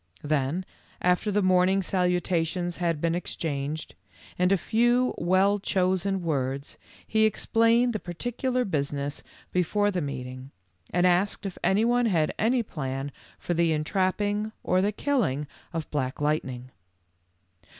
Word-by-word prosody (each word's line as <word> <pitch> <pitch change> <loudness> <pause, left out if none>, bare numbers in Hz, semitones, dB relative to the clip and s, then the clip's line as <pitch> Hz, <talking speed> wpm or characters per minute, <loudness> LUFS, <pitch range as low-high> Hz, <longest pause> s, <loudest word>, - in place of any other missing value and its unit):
Then, 150 +4 0 0.3
after 180 +4 +2
the 205 0 +1
morning 185 +1 +3
salutations 180 -1 0
had 170 -3 0
been 165 +1 +1
exchanged, 155 -3 -3 0.4
in 180 +1 +2
a 195 - +5
few 240 +7 +2
well 190 +4 +3
chosen 190 -1 0
words, 140 -3 -2 0.3
he 220 0 +2
explained 230 +3 +3
the 215 - -2
particular 245 +8 -2
business 145 -4 -2 0.3
before 205 +4 +1
the 180 -2 -1
meeting, 130 -2 -6 0.4
and 180 0 +2
asked 180 +3 +2
if 195 - -5
any 205 +4 +3
one 240 0 +3
had 165 -7 +1
any 235 +2 +2
plan 135 -6 -4 0.3
for 175 - -2
the 170 -1 +2
entrapping 205 +6 0
or 185 0 +2
the 205 +2 +2
killing 210 - 0 0.3
of 165 -1 -4
Black 130 -3 -2
Light 150 +1 +1
ning. 130 0 -8
180 Hz, 135 wpm, -27 LUFS, 150-205 Hz, 0.4 s, a